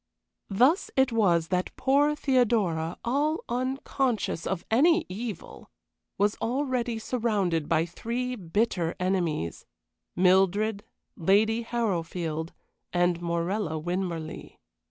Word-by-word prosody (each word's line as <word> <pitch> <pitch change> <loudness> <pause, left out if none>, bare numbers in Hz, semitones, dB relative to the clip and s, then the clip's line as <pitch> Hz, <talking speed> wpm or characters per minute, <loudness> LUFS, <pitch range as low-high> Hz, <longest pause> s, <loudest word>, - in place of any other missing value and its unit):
Thus 255 - +3
it 265 -1 +3
was 175 -8 +2
that 180 0 -1
poor 290 +3 +3
Theodora, 215 - +1
all 290 +6 0
unconscious 255 - -1
of 190 -3 -3
any 325 +8 +4
evil, 210 0 -7 0.5
was 205 +1 +2
already 250 -2 -1
surrounded 210 - -1
by 160 +1 +3
three 240 +8 -3
bitter 180 -3 -1
enemies 175 - -1 0.5
Mildred, 195 +3 +3 0.3
Lady 215 +6 +3
Harrowfield, 170 -8 -2 0.4
and 175 -1 +1
Morella 170 +1 -1
Winmarleigh. 170 -1 -4
205 Hz, 95 wpm, -27 LUFS, 175-245 Hz, 0.5 s, any